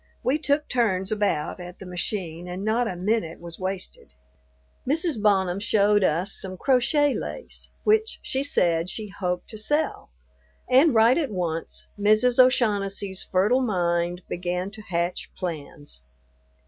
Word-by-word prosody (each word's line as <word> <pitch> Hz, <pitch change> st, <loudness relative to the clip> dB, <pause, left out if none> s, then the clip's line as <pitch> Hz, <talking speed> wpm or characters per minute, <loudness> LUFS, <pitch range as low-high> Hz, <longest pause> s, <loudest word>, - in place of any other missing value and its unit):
We 280 Hz, +4 st, +1 dB
took 295 Hz, 0 st, +1 dB
turns 200 Hz, -6 st, 0 dB
about 205 Hz, -7 st, -1 dB
at 180 Hz, 0 st, -9 dB
the 190 Hz, -, -10 dB
machine 180 Hz, -2 st, -4 dB
and 180 Hz, +3 st, -5 dB
not 230 Hz, +2 st, +1 dB
a 185 Hz, -, -3 dB
minute 185 Hz, -2 st, -1 dB
was 170 Hz, -1 st, -8 dB
wasted. 185 Hz, -, -5 dB, 0.7 s
Mrs. 310 Hz, -4 st, 0 dB
Bonham 190 Hz, -3 st, +2 dB
showed 205 Hz, 0 st, +3 dB
us 180 Hz, +4 st, +1 dB
some 185 Hz, -1 st, -3 dB
crochet 275 Hz, -, +3 dB
lace -, -, -6 dB
which 435 Hz, +1 st, +2 dB
she 265 Hz, -, -1 dB
said 175 Hz, -11 st, +1 dB
she 215 Hz, +1 st, -6 dB
hoped 180 Hz, -2 st, -3 dB
to 215 Hz, -, -5 dB
sell; 295 Hz, -, -1 dB, 0.6 s
and 265 Hz, +2 st, +5 dB
right 230 Hz, +6 st, +5 dB
at 295 Hz, -5 st, -1 dB
once 170 Hz, -4 st, -3 dB
Mrs. 215 Hz, +5 st, +3 dB
O'Shaughnessy's 200 Hz, -6 st, +2 dB
fertile 210 Hz, +8 st, +2 dB
mind 175 Hz, -5 st, 0 dB
begin 180 Hz, +2 st, -3 dB
to 215 Hz, -, -9 dB
hatch 175 Hz, -3 st, -2 dB
plans. 145 Hz, -, -7 dB
200 Hz, 140 wpm, -25 LUFS, 180-245 Hz, 0.7 s, and